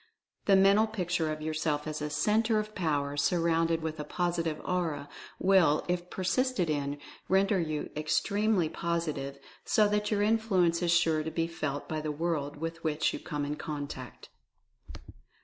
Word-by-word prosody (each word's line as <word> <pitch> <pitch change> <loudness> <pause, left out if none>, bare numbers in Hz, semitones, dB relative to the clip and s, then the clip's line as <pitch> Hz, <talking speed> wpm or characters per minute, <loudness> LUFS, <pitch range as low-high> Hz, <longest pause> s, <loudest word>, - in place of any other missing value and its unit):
The 195 - +5
Mental 200 +3 +5
Picture 175 -7 -1
of 155 0 -5
yourself 155 -1 -1
as 155 -1 -4
a 150 - -2
Centre 215 +9 +2
of 215 0 -2
Power, 145 -6 -1
surrounded 165 +1 +1
with 160 -1 -4
a - - -2
Positive 165 -1 -1
Aura, 160 -6 -1 0.3
will, 185 -6 +4
if 175 0 -2
persisted 190 -1 0
in, 145 -1 -2 0.3
render 195 +1 +3
you 155 -3 -3
extremely 195 +5 +1
Positive, 155 -5 -3 0.3
so 215 -1 +3
that 210 0 0
your 205 -1 +1
influence 200 -6 +2
is 175 - +1
sure 165 -2 +3
to 155 - -3
be 165 +1 -1
felt 155 -4 -4
by 155 -1 -3
the 155 0 -2
world 150 -2 -2
with 165 +2 -5
which 155 -1 +1
you - - -4
come 145 -2 -3
in 150 +1 -3
contact. 145 -5 -6
165 Hz, 160 wpm, -30 LUFS, 150-190 Hz, 0.3 s, The